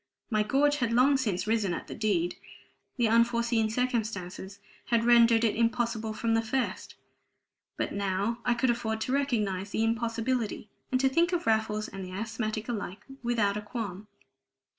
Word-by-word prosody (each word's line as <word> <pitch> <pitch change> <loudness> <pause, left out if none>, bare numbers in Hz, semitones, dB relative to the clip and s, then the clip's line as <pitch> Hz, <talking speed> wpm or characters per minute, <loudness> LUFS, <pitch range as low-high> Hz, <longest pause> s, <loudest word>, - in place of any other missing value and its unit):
My 215 -1 +3
gorge 285 +7 +2
had 240 -4 0
long 255 +4 +5
since 210 -9 -1
risen 215 -5 +1
at - - -6
the - - -8
deed; 185 -5 0 0.6
the 240 -2 +3
unforeseen 235 0 +2
circumstances 215 -6 -2 0.3
had 235 -1 +1
rendered 235 -1 +6
it 225 - +2
impossible 230 -1 0
from 225 +1 -1
the 225 - +3
first; 245 +3 -3 0.8
but - - -2
now 200 +3 -1
I 245 - +2
could 240 +1 +2
afford 220 -2 -2
to 255 - -2
recognize 210 -9 0
the 220 - 0
impossibility, 230 -1 -1 0.2
and 255 - +2
to 270 - +4
think 335 +6 +2
of 345 - -1
Raffles 220 -1 +1
and 195 0 -7
the 185 0 -8
asthmatic 215 +1 -3
alike 205 -4 -5 0.2
without 225 -4 +1
a - - -3
qualm. 210 -3 -6
225 Hz, 160 wpm, -29 LUFS, 210-240 Hz, 0.8 s, rendered